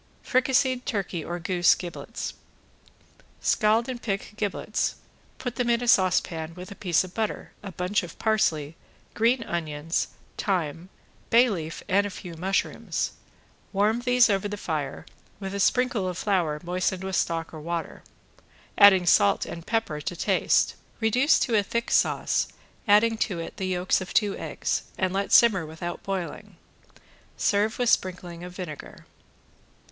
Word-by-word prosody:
~FRICASSED 255 0 +2
TURKEY 190 -6 -2
OR 175 +2 -4
GOOSE 175 0 +3
GIBLETS~ 175 -2 -6 1.1
Scald 220 +3 +2
and 250 -2 -5
pick 200 -1 -3
giblets. 215 0 -1 0.4
Put 245 -2 -5
them 245 -2 0
in 235 +1 +2
a - - -3
saucepan 175 -5 +2
with 180 +3 -9
a - - -8
piece 175 -4 +1
of 185 -1 -10
butter, 220 -2 -3
a 200 - -7
bunch 180 +3 0
of 175 -2 -9
parsley, 165 -9 +1 0.4
green 230 +2 +2
onions, 165 -4 -2 0.3
thyme, 175 -3 -1 0.4
bay 240 +1 +5
leaf 165 -4 -5
and 200 +2 +3
a - - -5
few 180 -2 -9
mushrooms; 190 +4 -1 0.6
warm 210 +3 +2
these 245 0 +4
over 200 -1 0
the 205 0 -5
fire, 155 -7 -4 0.3
with 195 -1 -5
a 200 - -3
sprinkle 245 -2 +2
of 180 - -5
flour 175 -8 0
moistened 185 +1 -1
with 190 0 -2
stock 165 -1 -1
or 155 - -8
water, 170 +1 -4 0.8
adding 195 -3 +8
salt 100 -11 +4
and 170 0 -8
pepper 225 -10 -1
to 175 - -4
taste. - - +2 0.3
Reduce 245 +7 +4
to 235 - +1
a 210 - +5
thick 235 +4 -3
sauce, - - +2 0.4
adding 220 +2 +5
to 195 -7 -1
it 165 - -7
the 190 -2 -2
yolks 180 0 +1
of 185 - -7
two 205 -3 +3
eggs, - - -2 0.2
and 185 -1 0
let 195 +1 -1
simmer 215 -7 +6
without 160 +2 -6
boiling. 190 -3 -5 0.8
Serve 210 +2 +1
with 245 -2 +1
sprinkling 175 -2 -1
of 180 0 -9
vinegar. 175 -6 -8
190 Hz, 150 wpm, -26 LUFS, 175-220 Hz, 1.1 s, adding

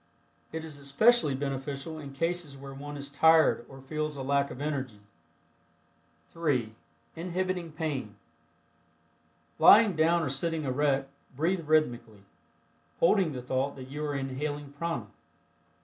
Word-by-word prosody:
It 160 0 -5
is 150 -3 -9
especially 145 - +4
beneficial 140 +3 -4
In 140 -2 -8
cases 165 0 -1
where 135 0 -9
one 145 +1 -7
is 140 0 -6
tired 160 -2 +4
or 135 0 -12
feels 150 +2 -3
a 135 - -5
lack 140 +1 +1
of - - -8
energy. 135 -8 -3 1.3
(3) 130 -10 -1 0.4
INHIBITING 180 0 -3
PAIN. 140 - -3 1.4
Lying 215 -4 +7
down 165 +2 +3
or 145 - -1
sitting 160 +4 -1
erect, 135 0 0 0.3
breath 175 +5 +1
rhythmically, 120 -9 +1 0.8
holding 175 -2 +3
the 125 -2 -6
thought 130 +2 -1
that 130 -1 -10
you 150 +2 -5
are 145 -1 -2
inhaling 140 +2 -4
prana. 165 +3 -3
145 Hz, 130 wpm, -29 LUFS, 135-160 Hz, 1.4 s, Lying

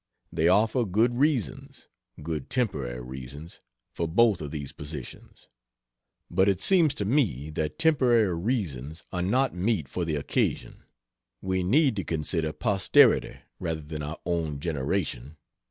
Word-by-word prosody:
They 80 - +2
offer 110 +7 +3
good 110 +4 +2
reasons 140 - -1 0.4
good 80 -3 -4
temporary 70 - -2
reasons 65 +5 -9 0.3
for 85 - -2
both 105 +2 +3
of 75 - -5
these 70 -3 -6
positions. 75 -3 -10 0.8
But 95 +2 +2
it 95 -2 +1
seems 165 - +3
to 100 - -3
me 95 - 0
that 75 0 -3
temporary 120 - +3
reasons 85 - -3
are 90 - -2
not 130 +9 +1
mete 90 - 0
for 90 - -3
the 80 -2 -1
occasion. 70 - -2 0.5
We 95 -1 -1
need 130 - +3
to 95 - -1
consider 80 0 -1
posterity 100 +2 +3 0.2
rather 80 -2 -2
than 75 0 -6
our 75 +2 -5
own 80 -4 -1
generation. 75 -2 -3
85 Hz, 140 wpm, -27 LUFS, 75-110 Hz, 0.8 s, offer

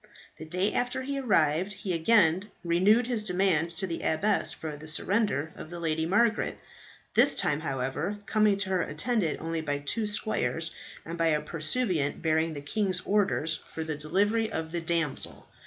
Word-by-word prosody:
The 160 - -7
day 180 +5 0
after 250 +1 -1
he 275 +1 -3
arrived, 185 - +2
he 190 -1 -4
again 185 +1 +3
renewed 190 +8 +4
his 235 -3 0
demand 180 -4 +1
to 190 - -2
the 170 -3 -4
abbess 200 +7 +1
for 155 -2 -6
the 155 +2 -11
surrender 160 - 0
of - - -9
the 175 0 -7
Lady 160 -1 -1
Margaret; 220 +5 +2 0.6
this - - +5
time, 150 0 +1
however, 140 +6 -2
coming 210 -1 +3
to 200 -1 0
her 185 -2 +2
attended 185 +1 0
only 165 0 -3
by 145 -2 -2
two 210 +10 -1
squires, 185 -5 -1 0.3
and 170 +1 -6
by 165 - +3
a 155 -2 +3
pursuivant 155 - 0
bearing 160 0 +1
the 145 - -6
king's 185 +5 0
order 205 -5 +1
for 160 0 -3
the 160 -1 -3
delivery 205 +9 0
of 160 -3 -4
the 170 0 -2
damsel. 165 -3 -2
170 Hz, 170 wpm, -28 LUFS, 155-205 Hz, 0.6 s, this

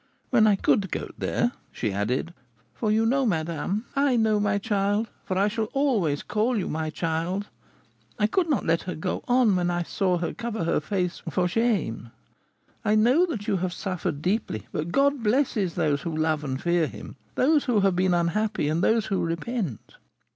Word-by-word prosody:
When 225 -4 +5
I 205 - +5
could 195 0 +1
go - - -4
there,' 240 - 0 0.2
she 105 -5 -2
added, 125 - -1 0.4
'for 215 -3 -1
you 220 +1 +3
know, 270 +4 +2
madame 180 +2 -1
' - - -29
'I 280 -2 +3
know, 220 -2 +3
my 205 -1 +1
child, 205 +1 0 0.2
for 185 - -2
I 200 +2 +3
shall 220 +1 -1
always 220 - +1
call 230 +1 0
you 195 - -1
my 155 0 -2
child 165 +5 -2 0.7
(I 210 - +2
could 340 - +1
not 285 - +1
let 165 +1 +2
her - - -3
go 155 - -3
on 245 -5 +4
when 175 -1 +1
I 175 0 0
saw 185 0 0
her 170 0 -3
cover 230 -5 -4
her 165 - +1
face 180 +2 -2
for 180 +2 +1
shame), 190 - 0 0.7
I 210 - +2
know 250 +12 +4
that 220 - -5
you 195 - +2
have 180 0 -2
suffered 175 -7 -3
deeply; 185 - -1
but 155 +3 -3
God 280 +1 +2
blesses 215 - +1
those 145 -2 +1
who 160 0 -4
love 155 -1 0
and 130 -2 -3
fear 170 -1 +1
him, - - -10 0.2
those 295 +3 +3
who 235 -6 +2
have 195 -2 +3
been 180 0 +2
unhappy, 175 0 0
and 160 +4 0
those 225 -1 +3
who 195 -3 -1
repent.'" 170 - -4
195 Hz, 190 wpm, -26 LUFS, 170-225 Hz, 0.7 s, When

